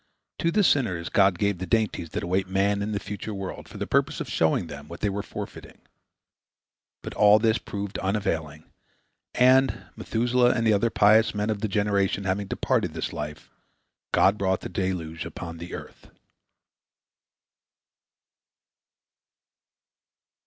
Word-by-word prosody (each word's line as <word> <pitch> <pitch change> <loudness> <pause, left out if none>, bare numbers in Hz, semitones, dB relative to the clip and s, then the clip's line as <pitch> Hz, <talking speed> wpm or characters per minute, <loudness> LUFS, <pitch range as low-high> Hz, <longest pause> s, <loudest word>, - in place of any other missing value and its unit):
To 165 - +1
the 205 +5 +2
sinners 95 - +1
God 95 -2 +3
gave 100 -2 0
the 95 - -4
dainties 110 -7 0
that - - -4
await 95 +2 0
man 100 +2 +1
in 105 +1 -2
the 100 - -1
future 105 +1 -6
world, 95 -1 -6
for - - -10
the - - -3
purpose - - +1
of - - -4
showing 80 +2 +1
them 75 -2 -9
what 85 - -10
they 100 - +1
were 100 +1 -2
forfeiting. - - -8 1.3
But - - -6
all 105 0 +6
this 110 +1 +2
proved 100 -1 -5
unavailing, 80 -7 -2 0.7
and, 130 +1 +4
Methuselah 120 +2 +2
and 115 -1 0
the 110 - +4
other 105 +3 +2
pious 110 +1 +4
men 105 +1 0
of 105 - -2
the 110 - 0
generation 100 -1 0
having 100 +1 -1
departed - - -1
this - - -3
life, 75 0 -7 0.6
God 100 +2 +3
brought 95 -1 0
the - - -6
deluge 90 -4 -3
upon 85 -1 -7
the 85 +1 -6
earth. - - -11
100 Hz, 145 wpm, -26 LUFS, 90-110 Hz, 1.3 s, all